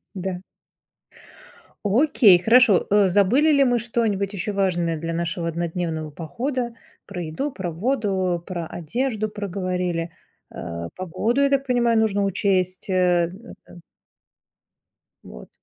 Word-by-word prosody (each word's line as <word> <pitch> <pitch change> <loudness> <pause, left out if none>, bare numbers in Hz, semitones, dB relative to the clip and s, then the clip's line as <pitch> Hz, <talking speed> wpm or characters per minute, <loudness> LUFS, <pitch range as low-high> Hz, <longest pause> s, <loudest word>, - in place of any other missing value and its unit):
Да. 185 -1 -4 1.4
Окей, 215 - +5
хорошо. 230 -2 +5
Э, 200 -2 +4
забыли 225 - +3
ли 280 -2 +4
мы 245 -1 +2
что-нибудь 220 -4 -1
еще 205 +2 -3
важное 175 -4 0
для 165 +1 -4
нашего 170 0 -2
однодневного 165 -2 -3
похода? 240 - -4 0.3
Про 180 -3 -6
еду, 165 - -3
про 185 -7 -5
воду, 190 -3 -1
про 175 -3 -4
одежду 215 - -2
проговорили. 180 -4 -3 0.4
А, 85 0 -6
погоду, 210 +8 -1
я 280 - +4
так 275 0 +1
понимаю, 235 -2 +2
нужно 205 -2 +1
учесть, 190 -1 0
э - - 0 0.7
это 175 - -14 1.4
Вот. - - -12
195 Hz, 120 wpm, -23 LUFS, 175-230 Hz, 1.4 s, Окей